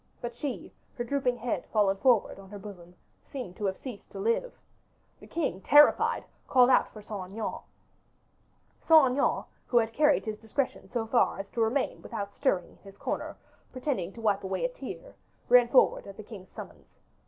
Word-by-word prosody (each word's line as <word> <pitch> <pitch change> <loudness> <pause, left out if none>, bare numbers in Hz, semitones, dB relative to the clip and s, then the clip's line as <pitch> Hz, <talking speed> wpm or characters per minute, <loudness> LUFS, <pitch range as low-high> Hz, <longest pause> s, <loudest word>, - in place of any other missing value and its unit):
But 240 0 -5
she, 265 +1 -5 0.2
her 240 - -3
drooping 250 -1 0
head 240 0 -3
fallen 205 -3 +3
forward 230 -2 +2
on 195 -1 -13
her 205 - -8
bosom, 180 -3 -11 0.3
seemed 250 -10 -7
to 210 - -3
have 190 -1 -1
ceased 245 -7 -9
to 195 - -6
live. 230 - -1 0.6
The - - -14
king, 280 - -2
terrified, 290 +6 +5 0.2
called 250 -1 +5
out - - +4
for 215 - -11
Saint 200 -3 -6
Aignan. 220 0 -4 1.2
Saint 310 -6 +6
Aignan, 275 +2 +1 0.2
who 245 - +2
had 225 -1 +2
carried 295 +1 +3
his 215 -1 -4
discretion 245 +5 -3
so 235 -2 -2
far 235 +2 +2
as 195 - -5
to 235 - -2
remain 240 +5 0
without 200 -3 -6
stirring 195 -11 0
in - - -21
his 195 0 -15
corner, - - -4 0.3
pretending 255 - -2
to 230 - -10
wipe 205 -3 +1
away 190 - -2
a - - +1
tear, - - -9 0.4
ran 245 -1 +7
forward 255 - +3
at 195 - -10
the 215 - -8
king's 200 -3 -11
summons. - - -12
230 Hz, 185 wpm, -29 LUFS, 200-260 Hz, 1.2 s, ran